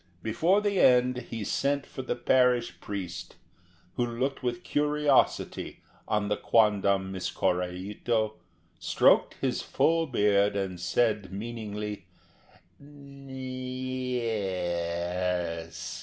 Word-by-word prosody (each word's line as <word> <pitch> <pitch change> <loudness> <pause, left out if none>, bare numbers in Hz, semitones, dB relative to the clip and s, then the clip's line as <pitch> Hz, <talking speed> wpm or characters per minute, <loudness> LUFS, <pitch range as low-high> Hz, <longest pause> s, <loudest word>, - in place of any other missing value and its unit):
Before 165 - +2
the 205 -2 +1
end 125 0 +5
he 115 -2 -4
sent 140 +6 0
for 130 - -7
the 130 - -2
parish 125 -1 +2
priest, 95 -4 -6 0.6
who 120 - +2
looked 130 +4 -2
with 120 -2 -2
curiosity 150 -1 +1 0.2
on 105 -1 0
the 105 - 0
quondam 100 -3 +2
Miss 95 -1 -3
Korraito, 100 +5 -1 0.5
stroked 85 -2 +3
his - - 0
full 165 0 +1
beard, 105 -4 +3
and 95 -3 -2
said 105 +1 +1
meaningly, 105 -1 -5 0.7
"N... 140 -1 -14
y... 130 -1 -4
es!" 90 -3 -2
110 Hz, 105 wpm, -28 LUFS, 95-130 Hz, 0.7 s, end